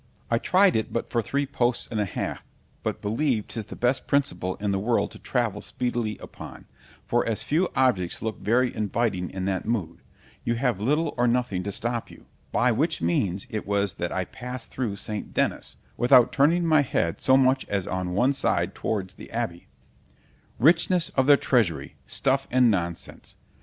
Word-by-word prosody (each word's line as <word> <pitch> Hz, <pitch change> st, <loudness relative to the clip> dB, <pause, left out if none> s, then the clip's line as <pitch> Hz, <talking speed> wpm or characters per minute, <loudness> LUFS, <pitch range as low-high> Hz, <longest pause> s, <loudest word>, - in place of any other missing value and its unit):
——I 115 Hz, -, +3 dB
tried 190 Hz, +6 st, +4 dB
it 110 Hz, -, -1 dB
but 115 Hz, -, -3 dB
for 120 Hz, -, +2 dB
three 140 Hz, +6 st, -1 dB
posts 120 Hz, -2 st, 0 dB
and 110 Hz, -, -1 dB
a 105 Hz, -, +1 dB
half, 95 Hz, -, -4 dB, 0.4 s
but -, -, -4 dB
believe 115 Hz, +1 st, 0 dB
'tis 110 Hz, -3 st, -6 dB
the -, -, -8 dB
best 125 Hz, +2 st, 0 dB
principle 95 Hz, -11 st, 0 dB
in 105 Hz, -1 st, -2 dB
the 95 Hz, -, 0 dB
world 115 Hz, +4 st, +1 dB
to -, -, -12 dB
travel -, -, -1 dB
speedily 120 Hz, -4 st, -2 dB
upon; -, -, -11 dB, 0.4 s
for 120 Hz, -, +1 dB
as 110 Hz, -2 st, -1 dB
few 170 Hz, +5 st, +1 dB
objects 100 Hz, -10 st, +1 dB
look 110 Hz, -1 st, -4 dB
very 125 Hz, +3 st, +1 dB
inviting 105 Hz, -3 st, -1 dB
in 95 Hz, -1 st, -4 dB
that 95 Hz, +1 st, -2 dB
mood—you 115 Hz, +3 st, -4 dB
have 120 Hz, -5 st, 0 dB
little 150 Hz, +7 st, +1 dB
or 120 Hz, 0 st, +3 dB
nothing 120 Hz, -6 st, 0 dB
to 100 Hz, +2 st, -4 dB
stop 120 Hz, +3 st, -3 dB
you; -, -, -15 dB, 0.3 s
by -, -, +3 dB
which -, -, 0 dB
means 85 Hz, +3 st, 0 dB
it 110 Hz, -2 st, -4 dB
was 100 Hz, -2 st, +1 dB
that -, -, -3 dB
I -, -, -1 dB
passed 125 Hz, -1 st, -8 dB
through 120 Hz, -6 st, -2 dB
St. 105 Hz, +1 st, -5 dB
Dennis, -, -, -1 dB, 0.2 s
without 125 Hz, 0 st, +5 dB
turning 165 Hz, +5 st, +3 dB
my 155 Hz, -2 st, +5 dB
head 85 Hz, -11 st, -1 dB
so 130 Hz, 0 st, +5 dB
much 130 Hz, 0 st, +3 dB
as 100 Hz, -3 st, -1 dB
on 90 Hz, -1 st, -3 dB
one 125 Hz, +7 st, +3 dB
side -, -, 0 dB
towards 95 Hz, -4 st, -3 dB
the -, -, -12 dB
Abby—— 110 Hz, -7 st, -4 dB, 0.9 s
——Richness 165 Hz, -, +3 dB
of 130 Hz, 0 st, +1 dB
their 145 Hz, -1 st, +8 dB
treasury! 110 Hz, -, +1 dB
stuff 135 Hz, 0 st, 0 dB
and 125 Hz, -2 st, +4 dB
nonsense! 85 Hz, -3 st, -4 dB
115 Hz, 180 wpm, -26 LUFS, 100-130 Hz, 0.9 s, their